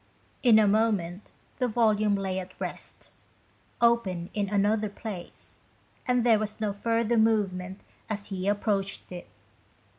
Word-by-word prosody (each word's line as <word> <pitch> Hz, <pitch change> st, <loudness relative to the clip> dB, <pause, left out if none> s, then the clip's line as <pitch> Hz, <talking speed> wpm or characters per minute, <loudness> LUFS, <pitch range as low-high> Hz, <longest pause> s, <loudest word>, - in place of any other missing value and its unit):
In 235 Hz, -4 st, +6 dB
a 215 Hz, -1 st, +5 dB
moment 200 Hz, -3 st, 0 dB, 0.3 s
the 250 Hz, -, +2 dB
volume 215 Hz, -3 st, +2 dB
lay 190 Hz, -1 st, -2 dB
at 185 Hz, 0 st, -10 dB
rest, -, -, -7 dB, 0.7 s
open 205 Hz, -8 st, +1 dB
in 205 Hz, -2 st, -1 dB
another 210 Hz, +1 st, +1 dB
place, 205 Hz, -4 st, -9 dB, 0.5 s
and 250 Hz, -1 st, +2 dB
there 225 Hz, -3 st, +5 dB
was 215 Hz, 0 st, -4 dB
no 210 Hz, -2 st, -1 dB
further 230 Hz, +2 st, 0 dB
movement 195 Hz, -4 st, 0 dB, 0.3 s
as 205 Hz, -2 st, -4 dB
he 190 Hz, -1 st, -3 dB
approached 200 Hz, -2 st, -1 dB
it. 175 Hz, -1 st, -8 dB
210 Hz, 130 wpm, -27 LUFS, 195-220 Hz, 0.7 s, In